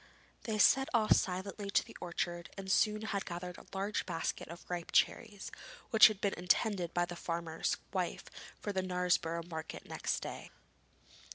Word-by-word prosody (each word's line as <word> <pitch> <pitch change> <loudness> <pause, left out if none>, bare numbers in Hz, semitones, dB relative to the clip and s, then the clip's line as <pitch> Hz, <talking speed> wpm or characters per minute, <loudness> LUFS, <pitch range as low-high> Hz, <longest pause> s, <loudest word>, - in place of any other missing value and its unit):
They 220 -2 -1
set 270 +5 +5
off 220 -2 +5
silently 195 +2 -2
to - - +3
the - - -13
orchard 175 -1 -3
and 190 -1 -3
soon 215 +2 +3
had 200 -3 -1
gathered 180 +1 -6
a - - -16
large 200 +2 -2
basket 165 - -2
of 170 +2 -10
ripe 175 -2 -4
cherries, 210 -4 +1 0.4
which 220 -2 +10
had 215 -3 -3
been 200 -1 +1
intended 180 0 +1
by 175 0 +1
the 175 - -7
farmer's 170 -1 -2 0.2
wife - - -1 0.4
for 205 - -3
the 190 - +1
Knaresborough 180 -2 0
market 160 -2 -6
next - - -2
day. - - -6
180 Hz, 165 wpm, -34 LUFS, 175-205 Hz, 0.4 s, which